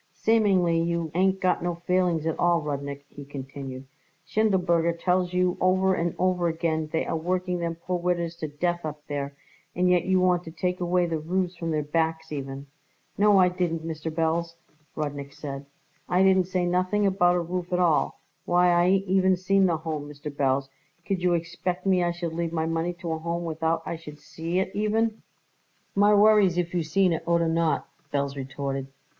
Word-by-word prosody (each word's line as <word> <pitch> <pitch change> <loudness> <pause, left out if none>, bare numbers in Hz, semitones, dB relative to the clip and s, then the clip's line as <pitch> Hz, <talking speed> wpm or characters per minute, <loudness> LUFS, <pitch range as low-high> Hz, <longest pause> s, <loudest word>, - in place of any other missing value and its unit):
"Seemingly 190 -7 +3
you 170 -1 -1
ain't 190 +2 +2
got 185 -1 +1
no 175 0 -1
feelings 175 -2 0
at 160 - -2
all, 175 -1 +3
Rudnik," 140 -2 -5
he 145 - -11
continued. 135 -1 -8 0.4
"Schindelberger 180 -6 +2
tells 180 0 +1
you 180 0 +1
over 190 +1 +3
and 170 -2 -1
over 180 -1 +1
again 160 -1 -1
they 160 - 0
are - - -2
working 180 +2 -1
them 170 -1 -2
poor 175 +2 -3
widders 170 -1 -1
to 155 - -4
death 175 +4 -2
up 150 -1 -6
there, 140 -1 -4 0.4
and 180 +1 +2
yet 180 -1 +3
you 185 0 +3
want 180 -1 +2
to 160 - -7
take 180 +3 -2
away 180 0 +2
the 165 -2 -2
roofs 180 +3 -1
from 165 -1 -4
their 155 -2 0
backs 160 +1 -1
even." 135 -1 -5 0.5
"No, 205 0 +5
I 185 -1 +6
didn't, 175 -3 -2
Mr. 160 0 -4
Belz," 165 +1 -1 0.4
Rudnik 145 -2 -4
said. 140 -1 -7 0.4
"I 180 +1 +3
didn't 190 -1 +4
say 180 -1 0
nothing 185 +4 +1
about 180 -2 +3
a - - +2
roof 175 +1 -4
at 180 - +2
all. 175 -4 +1 0.2
Why, 180 0 +4
I 175 0 +4
ain't 195 +2 +2
even 190 0 +3
seen 195 +1 +3
the 170 -2 +1
Home, 155 -2 -5
Mr. 145 0 -8
Belz. 135 -1 +1 0.4
Could 195 -2 -1
you 180 -1 +3
expect 175 +2 -3
me 185 -2 +3
I 175 - +1
should 170 -1 -4
leave 170 0 -2
my 160 -1 -1
money 165 +2 -1
to 170 -2 -3
a 160 - -2
Home 170 +1 -3
without 160 0 -1
I 170 - -4
should 150 -2 -11
see 165 +4 -4
it 190 0 0
even?" 220 +1 0 0.7
"My 205 +1 +4
worries 205 -4 +5
if 175 -1 -1
you 175 - +1
seen 180 +3 +2
it 160 - -2
oder 170 -1 +2
not!" 165 0 +1 0.2
Belz 140 -1 -1
retorted. 135 0 -4
170 Hz, 195 wpm, -26 LUFS, 160-180 Hz, 0.7 s, I